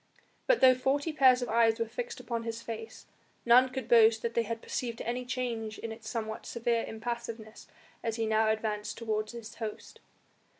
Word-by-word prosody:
But -, -, +4 dB
though 260 Hz, -1 st, +8 dB
forty 280 Hz, +5 st, 0 dB
pairs 260 Hz, -4 st, +5 dB
of 245 Hz, -, -4 dB
eyes 225 Hz, 0 st, +4 dB
were 230 Hz, -, 0 dB
fixed 470 Hz, -, -6 dB
upon 235 Hz, -2 st, -3 dB
his 230 Hz, 0 st, -5 dB
face, 225 Hz, -1 st, -7 dB, 0.4 s
none 250 Hz, +2 st, +6 dB
could 255 Hz, -3 st, -5 dB
boast 225 Hz, -2 st, +5 dB
that 235 Hz, 0 st, -2 dB
they 235 Hz, -, +2 dB
had 230 Hz, 0 st, -5 dB
perceived 235 Hz, -2 st, -4 dB
any 245 Hz, +2 st, -2 dB
change 235 Hz, -4 st, -3 dB
in 230 Hz, -, -6 dB
its 220 Hz, 0 st, -8 dB
somewhat 220 Hz, -2 st, -4 dB
severe 235 Hz, 0 st, 0 dB
impassiveness 225 Hz, -1 st, -6 dB, 0.3 s
as 225 Hz, -2 st, -2 dB
he 225 Hz, -1 st, -1 dB
now 220 Hz, 0 st, +2 dB
advanced 215 Hz, -1 st, -2 dB
towards 215 Hz, -1 st, -2 dB
his 230 Hz, -1 st, -8 dB
host. 215 Hz, -1 st, -6 dB
230 Hz, 180 wpm, -30 LUFS, 220-245 Hz, 0.4 s, though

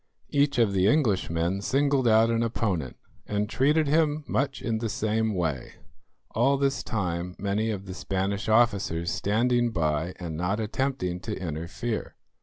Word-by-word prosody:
Each 140 Hz, -1 st, +2 dB
of 115 Hz, -4 st, +3 dB
the 95 Hz, 0 st, +3 dB
Englishmen 95 Hz, -, +1 dB
singled 135 Hz, +2 st, +2 dB
out 115 Hz, +1 st, +5 dB
an 115 Hz, 0 st, +1 dB
opponent, 100 Hz, -, -1 dB, 0.3 s
and 105 Hz, 0 st, -1 dB
treated 150 Hz, +7 st, +2 dB
him 150 Hz, 0 st, +2 dB
much 135 Hz, -1 st, -1 dB
in 115 Hz, -2 st, -2 dB
the 115 Hz, 0 st, -2 dB
same 110 Hz, 0 st, 0 dB
way, 80 Hz, -7 st, -2 dB, 0.6 s
all 135 Hz, +5 st, +2 dB
this 140 Hz, 0 st, 0 dB
time 90 Hz, -4 st, -3 dB
many 100 Hz, +3 st, -1 dB
of 100 Hz, -3 st, -4 dB
the 95 Hz, -, -6 dB
Spanish 95 Hz, +2 st, -2 dB
officers 100 Hz, -7 st, +2 dB
standing 120 Hz, +3 st, +1 dB
by 80 Hz, -3 st, -1 dB
and 85 Hz, -3 st, -6 dB
not 90 Hz, +6 st, -1 dB
attempting 110 Hz, -5 st, -2 dB
to 105 Hz, +3 st, -5 dB
interfere. 90 Hz, +7 st, -4 dB
110 Hz, 150 wpm, -27 LUFS, 90-120 Hz, 0.6 s, out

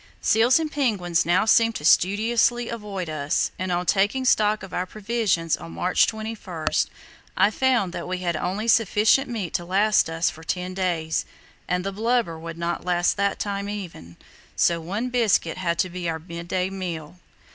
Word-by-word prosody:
Seals 230 Hz, +3 st, +4 dB
and 315 Hz, -2 st, -3 dB
penguins 190 Hz, -, 0 dB
now 175 Hz, +4 st, +3 dB
seemed 230 Hz, 0 st, +4 dB
to 150 Hz, -, -5 dB
studiously 230 Hz, +7 st, +3 dB
avoid 205 Hz, -6 st, -5 dB
us, 155 Hz, 0 st, -1 dB
and 185 Hz, 0 st, -2 dB
on 175 Hz, 0 st, 0 dB
taking 205 Hz, +8 st, +1 dB
stock 210 Hz, -4 st, +3 dB
of 190 Hz, -, -10 dB
our 180 Hz, +1 st, -2 dB
provisions 210 Hz, -6 st, 0 dB
on 85 Hz, 0 st, -10 dB
March 85 Hz, +1 st, +2 dB
21 215 Hz, -7 st, -6 dB, 0.7 s
I 205 Hz, -, +4 dB
found 240 Hz, -7 st, +1 dB
that 175 Hz, -, -5 dB
we 185 Hz, 0 st, -2 dB
had 175 Hz, -2 st, -2 dB
only 190 Hz, +7 st, -2 dB
sufficient 225 Hz, +3 st, +3 dB
meat 210 Hz, -8 st, -4 dB
to 175 Hz, -, -1 dB
last 195 Hz, +1 st, +2 dB
us 165 Hz, +1 st, 0 dB
for 160 Hz, -, -13 dB
ten 180 Hz, +2 st, -3 dB
days, 175 Hz, -4 st, -1 dB, 0.4 s
and 180 Hz, 0 st, 0 dB
the 195 Hz, -, -3 dB
blubber 220 Hz, -5 st, 0 dB
would 165 Hz, 0 st, -7 dB
not 170 Hz, 0 st, -3 dB
last 175 Hz, -1 st, +1 dB
that 200 Hz, 0 st, 0 dB
time 200 Hz, 0 st, -3 dB
even, 170 Hz, -, -8 dB, 0.4 s
so 170 Hz, -1 st, +2 dB
one 205 Hz, +9 st, -3 dB
biscuit 215 Hz, -8 st, +1 dB
had 170 Hz, -2 st, -1 dB
to 185 Hz, -, +1 dB
be 175 Hz, -1 st, -3 dB
our 160 Hz, -, -2 dB
midday 170 Hz, +3 st, -4 dB
meal. 175 Hz, -3 st, -6 dB
185 Hz, 175 wpm, -24 LUFS, 170-215 Hz, 0.7 s, Seals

